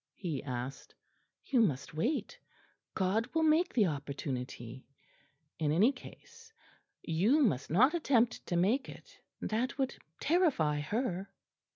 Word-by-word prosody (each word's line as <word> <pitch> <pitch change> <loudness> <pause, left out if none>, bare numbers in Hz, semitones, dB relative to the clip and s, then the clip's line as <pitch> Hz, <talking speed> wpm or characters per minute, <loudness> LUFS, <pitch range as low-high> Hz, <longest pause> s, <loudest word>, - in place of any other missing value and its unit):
he 165 -9 -3
asked. 135 +2 -6 0.5
"You 255 -4 +3
must 140 - 0
wait; 235 - -2 0.6
God 210 +6 +1
will 320 - +3
make 315 +3 +3
the 220 -5 +3
opportunity 135 -5 -5 0.7
in 150 -2 +1
any 200 - +5
case. 460 - -14 0.5
You 210 - +3
must 145 - +1
not 250 - +5
attempt 250 -8 +2
to 175 - -1
make 210 +11 +2
it. - - -13 0.2
That 235 +6 -1
would 270 -1 -1 0.2
terrify 275 - +2
her." 195 - -2
200 Hz, 120 wpm, -32 LUFS, -, 0.7 s, any